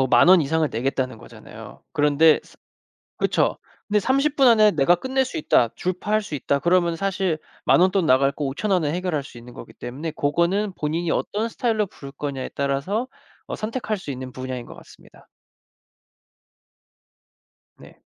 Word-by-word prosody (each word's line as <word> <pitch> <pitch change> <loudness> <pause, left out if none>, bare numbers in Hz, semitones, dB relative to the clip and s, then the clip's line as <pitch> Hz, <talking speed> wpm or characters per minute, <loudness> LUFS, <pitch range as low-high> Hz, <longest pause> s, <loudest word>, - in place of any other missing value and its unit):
뭐 130 - +3
10,000 125 +5 +5
원 185 -1 +8
이상을 160 +1 +1
내겠다는 130 0 -2
거잖아요. - - -13
그런데 150 +2 +4 0.8
그쵸. - - +1 0.3
근데 210 0 +2
'30 275 +7 +1
분 270 -2 +5
안에 215 -3 +6
내가 155 +2 +3
끝낼 265 +7 -1
수 295 - -6
있다. 125 - +3
주파할 205 +4 -1
수 180 -7 -6
있다.' 140 0 0
그러면 170 +1 +2
사실 190 -2 -1 0.3
10,000 - - +5
원 185 +1 +4
돈 190 -3 +1
나갈 135 0 +4
거 145 - -4
5,000 150 +10 -2
원에 165 -6 +2
해결할 175 -5 -2
수 130 - -13
있는 120 +1 -12
거기 - - -11
때문에 145 +7 -6
고거는 170 +8 0
본인이 165 +1 -2
어떤 215 +7 -1
스타일로 225 -2 0
부를 140 -6 -11
거냐에 140 -2 -5
따라서 140 - -1 0.4
어 - - -4
선택할 220 -1 -3
수 185 -7 -7
있는 130 -1 -7
분야인 130 -1 -6
것 - - -12
같습니다. - - -18 2.5
네. - - -16
165 Hz, 315 characters per minute, -23 LUFS, 140-205 Hz, 2.5 s, 원